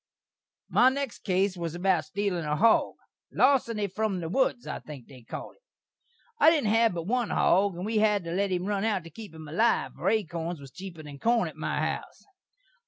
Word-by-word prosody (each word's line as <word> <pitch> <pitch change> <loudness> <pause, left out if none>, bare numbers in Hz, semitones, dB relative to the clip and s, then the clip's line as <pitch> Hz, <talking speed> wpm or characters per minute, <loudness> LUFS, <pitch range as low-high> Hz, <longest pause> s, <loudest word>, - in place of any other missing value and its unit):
My 250 - +5
next 275 -2 -4
case 190 0 0
was 170 -2 -4
about 180 -2 +1
steelin' 200 -4 -2
a 150 0 -1
hog. 220 +9 +3 0.4
Larseny 230 -6 +2
from 200 0 -2
the 165 -2 -4
woods, 250 +3 +1
I - - -5
think 140 -6 -10
they 130 -3 -14
call 115 - -7
it. - - -28 0.8
I - - +8
didn't 290 -10 +2
hav 225 -3 +3
but 170 - -3
one 240 +3 0
hog, 195 +1 +2
and 180 +2 -5
we 220 0 0
had 210 -3 +2
to 170 - -5
let 195 +2 0
him 180 0 -1
run 200 0 -1
out 210 -5 0
to 165 - -12
keep 210 +2 -10
him 160 -1 -10
alive, 220 +10 +1
for - - -1
akorns 170 -5 -2
was 135 -2 -12
cheeper 180 -3 -9
than 145 -2 -10
corn 235 +4 +2
at - - -9
my - - -3
house. - - -4
195 Hz, 205 wpm, -28 LUFS, 170-220 Hz, 0.8 s, I